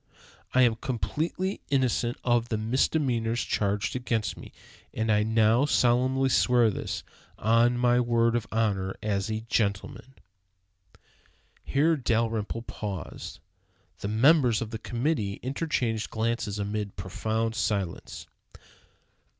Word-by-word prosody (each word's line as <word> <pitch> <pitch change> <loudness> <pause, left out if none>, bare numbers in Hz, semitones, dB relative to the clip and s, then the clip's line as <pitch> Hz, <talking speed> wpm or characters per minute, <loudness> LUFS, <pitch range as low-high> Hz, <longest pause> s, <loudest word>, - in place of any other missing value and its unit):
I 130 - +6
am 115 -2 +3
completely 160 - -2
innocent 125 -3 +1
of 120 -1 +1
the 110 - 0
misdemeanors 120 0 0
charged 100 +2 -1
against 115 -3 -1
me, - - -11 0.4
and 110 0 -1
I 105 0 +3
now 110 +4 +3
solemnly 130 +1 +2
swear 120 -3 +4
this, - - -4 0.3
on 115 +3 +3
my 120 0 +3
word 115 -1 +2
of 115 -2 -1
honor 100 -4 0
as 100 -1 -1
a 110 0 -2
gentleman." 115 +4 -2 1.5
Here 155 +4 +2
Dalrymple 115 -3 -1
paused. 100 -6 -6 0.6
The - - -4
members 125 +2 +4
of 115 -1 -5
the 110 - -5
committee 120 -4 -1
interchanged 125 -5 -1
glances 110 -2 -2
amid 105 0 -3
profound 110 +5 -2
silence. 100 -4 -3
115 Hz, 115 wpm, -27 LUFS, 110-125 Hz, 1.5 s, I